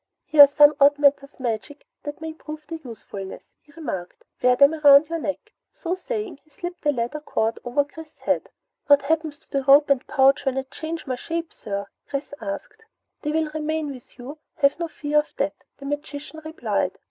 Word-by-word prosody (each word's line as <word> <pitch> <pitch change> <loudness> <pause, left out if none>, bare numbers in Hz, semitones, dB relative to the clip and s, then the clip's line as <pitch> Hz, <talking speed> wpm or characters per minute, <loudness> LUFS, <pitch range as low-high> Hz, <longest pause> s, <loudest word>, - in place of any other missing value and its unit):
"Here 305 - +6
are - - -3
some 290 +1 +6
oddments 285 0 +5
of 275 0 -16
magic 250 +4 -4 0.2
that 290 +1 -7
may 320 0 -5
prove 305 -1 -9
their 330 0 -6
usefulness," 205 -5 -9
he 295 - -23
remarked. 190 - -6 0.2
"Wear 250 0 +5
them 280 +4 +6
about 295 -1 +7
your 335 0 -2
neck." 300 +8 -4 0.2
So 345 0 -3
saying 405 - -4
he 310 - -30
slipped 350 +4 -7
the 295 - +2
leather 245 +3 -3
cord 225 -6 -1
over 250 +4 +1
Chris's 310 +2 -13
head. - - -1 0.4
"What 285 -1 +6
happens 310 0 -1
to 320 - -30
the 275 -2 0
rope 280 +2 +6
and 270 -2 +1
pouch 270 0 +4
when 270 -1 -1
I 265 - 0
change 315 +4 -6
my 255 -3 -3
shape, 330 +4 -4
sir?" 200 -1 -5 0.2
Chris 280 +1 -4
asked. 200 - -6 0.4
"They 300 - -2
will 315 0 0
remain 310 -1 -2
with 250 -2 -15
you, 275 +5 -9 0.2
have 280 +2 +2
no 340 - -1
fear 300 -1 0
of 300 - -5
that," 285 +1 0 0.2
the 275 - -11
magician 290 +2 -5
replied. 315 +1 -2
290 Hz, 195 wpm, -24 LUFS, 275-315 Hz, 0.4 s, about